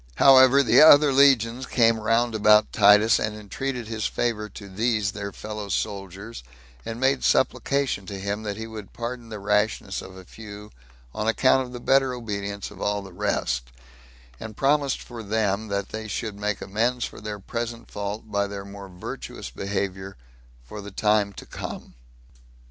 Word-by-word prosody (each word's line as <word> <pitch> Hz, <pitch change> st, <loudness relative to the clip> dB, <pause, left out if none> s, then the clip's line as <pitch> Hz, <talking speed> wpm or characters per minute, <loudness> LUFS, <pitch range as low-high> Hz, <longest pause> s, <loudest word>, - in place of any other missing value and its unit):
However, 135 Hz, 0 st, +7 dB
the 120 Hz, 0 st, +5 dB
other 145 Hz, -2 st, +8 dB
legions 130 Hz, -3 st, +4 dB
came 115 Hz, -2 st, +3 dB
round 115 Hz, +2 st, +1 dB
about 105 Hz, 0 st, +4 dB
Titus, 105 Hz, +1 st, +6 dB
and 110 Hz, 0 st, -2 dB
entreated 120 Hz, +4 st, -5 dB
his 110 Hz, -2 st, -2 dB
favor 105 Hz, -3 st, -2 dB
to 100 Hz, -, -11 dB
these 110 Hz, +1 st, 0 dB
their 100 Hz, -1 st, -6 dB
fellow 105 Hz, -1 st, -7 dB
soldiers, 100 Hz, -, -4 dB, 0.4 s
and 115 Hz, -, -6 dB
made 130 Hz, 0 st, +2 dB
supplication 135 Hz, -7 st, +1 dB
to 100 Hz, -, -6 dB
him, 100 Hz, +2 st, -3 dB
that 105 Hz, -1 st, -4 dB
he 110 Hz, -, -5 dB
would 110 Hz, -3 st, -9 dB
pardon 120 Hz, 0 st, -6 dB
the 110 Hz, -, -6 dB
rashness 105 Hz, +2 st, 0 dB
of 95 Hz, 0 st, -11 dB
a 95 Hz, -, -12 dB
few, 105 Hz, +1 st, -11 dB, 0.4 s
on 110 Hz, -, -3 dB
account 130 Hz, +3 st, +3 dB
of -, -, -12 dB
the 125 Hz, -, -7 dB
better 135 Hz, 0 st, +2 dB
obedience 100 Hz, -4 st, -5 dB
of 100 Hz, -, -12 dB
all 105 Hz, -1 st, -1 dB
the 95 Hz, -2 st, -12 dB
rest; 60 Hz, -11 st, -2 dB, 0.7 s
and 110 Hz, -1 st, -8 dB
promised 140 Hz, 0 st, +1 dB
for 120 Hz, -2 st, -9 dB
them 110 Hz, 0 st, -1 dB
that 100 Hz, -1 st, -3 dB
they 110 Hz, 0 st, -6 dB
should 110 Hz, +1 st, -4 dB
make 105 Hz, 0 st, -3 dB
amends 115 Hz, +5 st, 0 dB
for -, -, -10 dB
their 105 Hz, -1 st, -5 dB
present 115 Hz, +3 st, -5 dB
fault, 105 Hz, +1 st, -4 dB
by 100 Hz, 0 st, 0 dB
their 100 Hz, -1 st, -7 dB
more 100 Hz, -1 st, -10 dB
virtuous 90 Hz, 0 st, -8 dB
behavior 95 Hz, -2 st, -4 dB, 0.5 s
for 105 Hz, -, -9 dB
the 100 Hz, -, -8 dB
time 105 Hz, 0 st, +1 dB
to -, -, -10 dB
come. -, -, -8 dB
105 Hz, 170 wpm, -24 LUFS, 100-120 Hz, 0.7 s, other